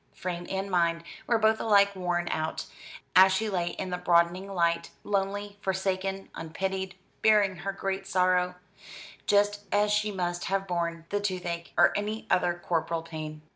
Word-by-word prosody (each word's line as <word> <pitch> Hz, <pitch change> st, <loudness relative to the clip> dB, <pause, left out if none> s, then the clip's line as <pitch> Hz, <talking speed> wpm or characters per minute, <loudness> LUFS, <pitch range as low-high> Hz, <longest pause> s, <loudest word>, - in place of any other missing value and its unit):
Frame 175 Hz, -1 st, -4 dB
and 195 Hz, +1 st, -3 dB
mind 170 Hz, -2 st, +2 dB, 0.2 s
were 235 Hz, -, +3 dB
both 220 Hz, 0 st, +3 dB
alike 200 Hz, -2 st, +4 dB
worn 175 Hz, -2 st, -1 dB
out, 155 Hz, 0 st, -2 dB, 0.5 s
as 190 Hz, +1 st, +8 dB
she 215 Hz, +3 st, 0 dB
lay 175 Hz, -3 st, 0 dB
in 185 Hz, +1 st, -4 dB
the 180 Hz, -, -2 dB
broadening 180 Hz, +2 st, +2 dB
light, 170 Hz, -2 st, +1 dB
lonely, 200 Hz, 0 st, -2 dB
forsaken, 190 Hz, 0 st, -2 dB
unpitied, 190 Hz, +3 st, -3 dB, 0.3 s
bearing 205 Hz, -4 st, +4 dB
her 195 Hz, +3 st, -3 dB
great 195 Hz, 0 st, -3 dB
sorrow, 180 Hz, -1 st, +2 dB, 0.7 s
just 205 Hz, 0 st, +3 dB
as 205 Hz, +1 st, +3 dB
she 210 Hz, 0 st, +1 dB
must 175 Hz, -2 st, -2 dB
have 195 Hz, +1 st, -1 dB
borne 170 Hz, -2 st, -2 dB
the 205 Hz, -, 0 dB
toothache, 180 Hz, -4 st, -3 dB
or -, -, +5 dB
any 210 Hz, +2 st, -2 dB
other 175 Hz, -1 st, +3 dB
corporal 165 Hz, -1 st, -1 dB
pain. 155 Hz, -2 st, -7 dB
190 Hz, 155 wpm, -28 LUFS, 175-200 Hz, 0.7 s, as